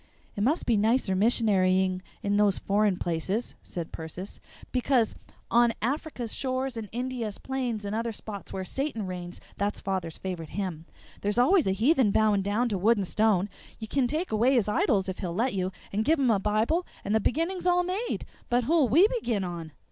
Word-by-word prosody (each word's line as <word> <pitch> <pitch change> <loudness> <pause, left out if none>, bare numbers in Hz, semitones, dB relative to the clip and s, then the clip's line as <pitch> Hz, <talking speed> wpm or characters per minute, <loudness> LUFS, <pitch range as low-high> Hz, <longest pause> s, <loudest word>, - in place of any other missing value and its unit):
"It 205 - -3
must 285 +10 +1
be 230 -3 +3
nicer 220 -2 +2
missionarying 190 -4 +2 0.2
in 200 0 +1
those 205 -2 +3
foreign 200 -1 +1
places," 180 +8 -2
said 170 -2 -6
Persis, 165 +5 -7 0.3
"because 250 -3 +2 0.4
on 235 0 +5
'Afric's 250 -1 -2
shores 260 -1 -2
and 220 -3 -5
India's 245 -3 -3
plains 245 -6 -3
and 200 +1 -2
other 230 +1 -1
spots 205 -2 -8
where 190 -1 -4
Satan 265 -1 -2
reigns' 180 -1 -6 0.2
(that's 205 +1 -1
father's 185 -4 -3
favorite 175 -4 -5
hymn) 180 -5 -3 0.4
there's 205 +2 -1
always 320 - +4
a - - +3
heathen 245 - +3
bowing 210 -1 +3
down 205 +5 +1
to 200 -4 -1
wood 225 +5 +4
and 195 -2 -1
stone. 210 -3 +2 0.3
You 220 - -7
can 265 +1 +1
take 315 +7 -2
away 235 +5 +3
his 225 -5 +2
idols 200 -2 +2
if 185 - -4
he'll 175 -4 -3
let 245 +6 +1
you 185 -1 -1 0.2
and 210 +2 +1
give 315 +5 +3
him 260 -4 +3
a 205 - +3
bible 215 - +1 0.2
and 205 - 0
the 220 - +4
beginning's 335 - -1
all 355 0 +4
made. 380 +7 -2 0.2
But 245 +1 +2
who'll 300 -1 +3
we 335 - +6
begin 245 - -1
on? 170 -3 -5
215 Hz, 190 wpm, -28 LUFS, 195-255 Hz, 0.4 s, we